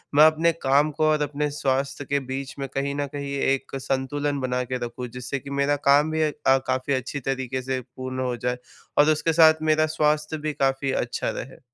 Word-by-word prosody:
मैं 150 - +8
अपने 160 +2 +3
काम 140 +3 +3
को 155 +2 -2
और 155 -1 +2
अपने 145 +1 -2
स्वास्थ्य 140 0 -1
के 140 +1 0
बीच 135 0 -4
में 135 - -3
कहीं 140 +1 -1
न 145 - -1
कहीं 140 -1 -4
एक 135 0 0
संतुलन 140 +2 -1
बना 125 0 -1
के 130 - 0
रखूँ, 125 +1 -6
जिससे 125 +3 -5
कि 140 - -11
मेरा 145 +1 +2
काम 145 +3 +5
भी 160 0 0
अ, 150 - +1 0.2
काफ़ी 130 +1 +1
अच्छी 130 +2 -2
तरीक़े 130 -1 -3
से 130 0 -2 0.2
पूर्ण 130 0 -4
हो 125 -1 -1
जाए 125 +1 -2 0.4
और 150 +1 +6
उसके 160 +2 +1
साथ 160 -1 +6
मेरा 155 0 +3
स्वास्थ्य 150 +1 +1
भी 150 - -1
काफ़ी 135 0 0
अच्छा 120 0 -3
रहे। 130 - -9
140 Hz, 205 wpm, -24 LUFS, 130-150 Hz, 0.4 s, मैं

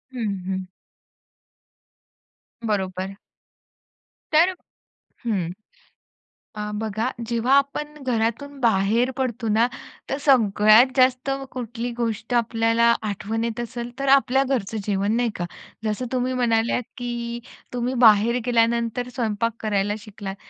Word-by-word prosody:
हं, 220 -5 -1
हं. 190 0 -2 2.0
बरोबर. 190 -2 -2 1.2
तर 345 +4 +5 0.7
हं. 190 -7 0 1.1
अ, 210 - -4 0.2
बघा 220 +1 -2 0.2
जेव्हा 235 +3 +1
आपण 295 +2 -1
घरातून 250 +4 -1
बाहेर 230 +2 +2
पडतो 240 -3 -2
ना 225 +3 +4 0.4
तर 275 - -1
सगळ्यात 220 -3 +6
जास्त 255 +1 +3 0.2
कुठली 240 -1 -4
गोष्ट 230 0 -2
आपल्याला 230 0 +3 0.2
आठवण 215 +3 -3
येत 235 0 -3
असेल 240 0 -5
तर 275 - -2
आपल्या 270 0 +2
घरचं 230 -6 -2
जेवण, 200 0 +1
नाही 240 -1 +1
का? 175 - -3 0.4
जसं 215 +4 -1
तुम्ही 255 0 0
म्हणाल्यात 235 -1 +1
की 240 -1 -4 0.3
तुम्ही 245 +1 -1
बाहेर 225 +2 +6
गेल्यानंतर 235 +1 +1
स्वयंपाक 230 -1 -1
करायला 205 -1 0
शिकलात. 200 -2 -8
230 Hz, 110 wpm, -23 LUFS, 215-250 Hz, 2.0 s, सगळ्यात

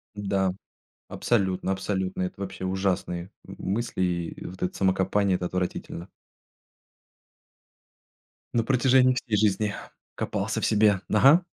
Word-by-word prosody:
Да, 95 -2 0 0.6
абсолютно, 95 -4 0
абсолютно. 95 -1 -2
Это 90 +2 -4
вообще 95 -1 -5
ужасные 95 -1 -1 0.2
м - - -10
мысли, 105 0 -2
и 85 -2 -2
вот 90 +1 -10
это 90 - -1
самокопание- 95 0 +2
это 90 - -3
отвратительно. 90 -1 -4 2.5
На 115 - +2
протяжении 130 +1 +4
всей 120 -3 -1
жизни 105 -1 +1 0.4
копался 110 +2 -2
в - - +1
себе. 105 -3 +4
Ага. 140 - +6
95 Hz, 115 wpm, -26 LUFS, 95-110 Hz, 2.5 s, Ага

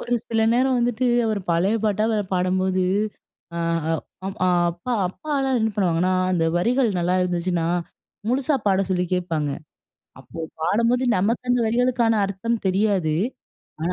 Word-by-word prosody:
ஒரு 245 - -4 0.2
சில 225 -1 +1
நேரம் 255 +2 +2
வந்துட்டு, 240 +1 0 0.2
அவரு 215 -2 -1
பழைய 180 +6 +2
பாட்டாவே 215 +1 +1 0.2
பாடும்போது, 185 +1 +1 0.7
அ - - -2 0.7
அம் 195 +1 -5 0.3
அப்பா 175 +9 -5 0.2
அப்பாலாம் 270 +3 -1
என்ன 220 0 +1
பண்ணுவாங்கன்னா, 180 -2 +1 0.2
அந்த 170 -3 +1
வரிகள் 240 +7 +2
நல்லா 175 +1 +1
இருந்துச்சுனா, 175 -1 -1 0.6
முழுசா 275 +4 +1
பாட 195 -1 +3
சொல்லி 180 -1 +1
கேட்பாங்க. 165 -5 -1 0.7
அப்போ - - -11 0.2
பாடும்போது 235 +9 +2
நமக்கு 230 +6 0
அந்த 245 0 +3
வரிகளுக்கான 235 0 +2
அர்த்தம் 215 +4 -2
தெரியாது. 190 -4 +1 0.7
ஆனா 170 +3 0
200 Hz, 130 wpm, -23 LUFS, 180-240 Hz, 0.7 s, பாட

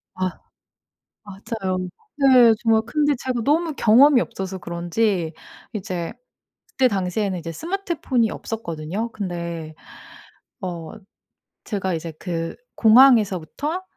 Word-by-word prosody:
아 185 -1 -3 0.8
맞아요. 195 -1 -4 0.4
네 255 -5 +6
정말 225 -1 +3
근데 295 +3 +1
제가 245 -1 -3
너무 315 +3 +1
경험이 250 +4 +6
없어서 190 -4 -5
그런지 170 0 -1 0.4
이제 185 -3 -4 0.5
그때 260 -1 +2
당시에는 190 -1 -1
이제 165 0 -6
스마트폰이 325 - -1
없었거든요. 200 +1 -5
근데 170 -6 -5 0.9
어 170 -4 -5 0.7
제가 190 -4 -2
이제 165 +1 -5
그 165 -2 -4 0.2
공항에서부터 240 - +4
210 Hz, 240 characters per minute, -22 LUFS, 175-245 Hz, 0.9 s, 네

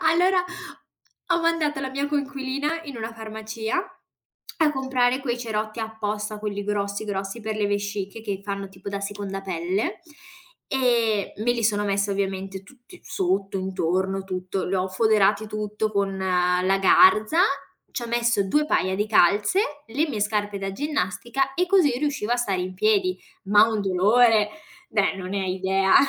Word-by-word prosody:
Allora, 360 +3 +3 0.9
ho 340 - +2
mandato 315 -4 +1
la 265 -1 -3
mia 280 +2 -1
coinquilina 285 +2 -2
in 280 -5 -8
una 225 0 -5
farmacia 220 +2 -4 0.8
a 305 -2 +4
comprare 260 -1 +1
quei 245 -3 -2
cerotti 220 -1 -3
apposta, 215 -1 -3
quelli 205 -1 -4
grossi 200 0 -2
grossi 195 +2 -4
per 215 0 -3
le 210 -1 +1
vesciche 205 +1 -3
che 200 -3 -3
fanno 200 -1 -4
tipo 190 +1 -10
da 200 0 -3
seconda 200 -1 -4
pelle, 185 - -2 0.7
ehm, 235 -6 +1
me 240 - +3
li 235 -2 -2
sono 205 -1 +2
messa 200 0 0
ovviamente 195 -1 -3
tutti 255 - -17
sotto, 195 +1 -1
intorno, 190 +1 -1
tutto. 185 0 -3
Li 190 - -2
ho 185 0 0
foderati 215 +1 +3
tutto 215 0 -2
con 200 -1 0
la 180 0 +2
garza, 215 - +5 0.5
ci 245 - -3
ho 235 - -5
messo 235 -4 +1
2 300 +7 +2
paia 190 -7 +1
di 210 +1 0
calze, 210 - +4 0.3
le 290 +8 0
mie 220 -8 -3
scarpe 205 -1 -1
da 195 0 -4
ginnastica 270 +1 -1
e 360 +1 +1
così 365 -7 +4
riuscivo 275 -6 -1
a - - +2
stare 200 -7 0
in 185 +1 -4
piedi. 200 -2 +2 0.3
Ma 205 +2 +6
un 220 -2 -1
dolore, 210 +3 +4 0.4
beh 205 -7 +1
non 185 -1 -6
ne 200 -1 -1
hai 185 -1 -1
idea. 190 +1 +2
210 Hz, 160 wpm, -24 LUFS, 195-240 Hz, 0.9 s, Ma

